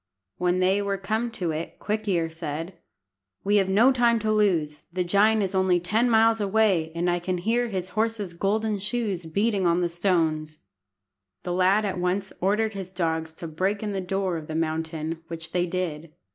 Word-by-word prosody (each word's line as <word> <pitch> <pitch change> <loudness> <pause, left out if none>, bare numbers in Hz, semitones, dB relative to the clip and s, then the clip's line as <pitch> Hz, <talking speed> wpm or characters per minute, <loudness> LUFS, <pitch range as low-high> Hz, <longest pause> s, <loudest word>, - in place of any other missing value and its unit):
When 180 +1 +1
they 190 +2 +3
were 200 -1 -1
come 220 +5 -1
to 175 -6 -2
it, 160 +2 -5
Quick 215 +1 -3
ear 170 -4 +1
said 160 +2 -5 0.7
"We 205 +1 +3
have 195 -1 +2
no 225 +7 +5
time 240 -2 +3
to 215 0 0
lose. 170 -9 +1
The 180 +1 -1
giant 205 +4 +3
is 195 0 -2
only 190 -2 +3
ten 215 +8 +1
miles 225 -1 +4
away, 195 -6 +2
and 170 +1 0
I 175 0 +1
can 180 +1 -2
hear 230 +7 +1
his 185 -4 -4
horse's 215 -2 -1
golden 210 +4 0
shoes 205 -5 -2
beating 200 +2 +1
on 170 +1 +2
the 175 - +2
stones." 160 -4 0 0.9
The 175 - -2
lad 190 +4 +3
at 190 -2 -2
once 185 +2 -1
ordered 215 +4 +1
his 190 -2 -6
dogs 160 -3 -2
to 165 - -7
break 190 +6 -1
in 210 - -2
the 195 -1 -2
door 190 -1 -1
of 155 -1 -8
the 155 - -5
mountain, 160 0 -2
which 165 -1 -7
they 180 0 0
did. 170 -3 -3
185 Hz, 190 wpm, -25 LUFS, 170-210 Hz, 0.9 s, no